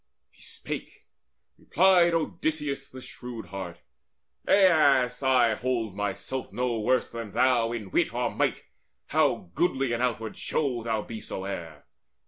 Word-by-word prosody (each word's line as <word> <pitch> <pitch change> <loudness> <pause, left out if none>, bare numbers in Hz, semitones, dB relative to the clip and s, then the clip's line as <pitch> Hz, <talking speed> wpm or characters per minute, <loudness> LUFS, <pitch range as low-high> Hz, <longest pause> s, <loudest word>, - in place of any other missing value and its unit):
He - - -24
spake; - - -8 0.5
replied 175 -1 +4
Odysseus 150 -3 -2
the 130 - -10
shrewd 120 -2 -8
heart: 95 -3 -7 0.7
"Aias, 145 -10 +4
I 125 -4 +4
hold 115 -4 -2
myself 105 +6 -4
no 125 -2 -1
worse 125 +3 +1
than 115 -3 -6
thou 120 -1 +3
In 105 -5 -5
wit - - +2
or - - -1
might, - - 0 0.5
how 85 - +1
goodly 135 - +1
in 120 - -1
outward 115 -3 -2
show 130 -6 -1
Thou 110 -2 -1
be 110 -1 -7
soever. 85 -6 -6
125 Hz, 130 wpm, -27 LUFS, 110-135 Hz, 0.7 s, replied